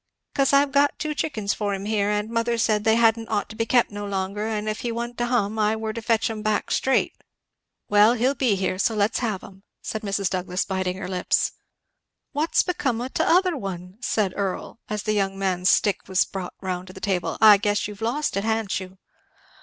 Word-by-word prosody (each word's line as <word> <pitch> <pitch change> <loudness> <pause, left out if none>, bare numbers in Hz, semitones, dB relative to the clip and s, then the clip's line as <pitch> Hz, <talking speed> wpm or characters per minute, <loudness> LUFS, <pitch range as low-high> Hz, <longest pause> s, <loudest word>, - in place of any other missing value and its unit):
"Cause 275 -1 +2
I've 280 0 +4
got 285 +1 +3
ten 305 -1 -2
chickens 225 -10 -1
for 205 -2 -2
him 195 +1 -6
here, 210 -1 +1
and 210 0 0
mother 230 0 0
said 215 -2 +1
they 220 0 +5
hadn't 225 -1 +3
ought 210 -2 -1
to 220 - -9
be 225 +1 -1
kept 245 -2 +3
no 205 0 -6
longer, 200 +1 -2
and 215 -1 -2
if 215 0 -2
he 240 - -2
wa'n't 235 +1 -4
to 240 - 0
hum 220 -3 0
I 215 +1 +2
were 220 0 -4
to 230 - -5
fetch 225 -1 +1
'em 220 -1 -4
back, 215 0 -1
straight." 265 - +2 0.7
"Well 210 +3 +5
he'll 250 +3 +2
be 250 -6 +1
here, 185 -1 -2
so 225 - +1
let's 205 0 +1
have 215 -6 -2
'em," 190 0 -13 0.2
said 220 - -4
Mrs. 200 -2 -1
Douglass 180 0 -2
biting 185 -2 -2
her 190 -2 -5
lips. 180 -1 0 0.8
"What's 300 +3 +1
become 275 -10 -1
o' 250 +2 -3
t'other 355 +4 +2
one?" 190 -4 -6
said 210 -5 0
Earl, 200 +3 -3
as 210 -1 -3
the 215 - 0
young 195 -2 0
man's 185 -1 +1
stick 205 -2 +2
was 190 0 +3
brought 190 -2 -6
round 185 -1 -4
to 185 - -11
the 190 - -10
table; 180 -5 -1
"I 215 -2 +9
guess 205 0 0
you've 210 0 -10
lost 245 +5 -1
it, 195 - -1
ha'n't 220 -3 0
you?" 185 0 -10
210 Hz, 215 wpm, -24 LUFS, 195-230 Hz, 0.8 s, I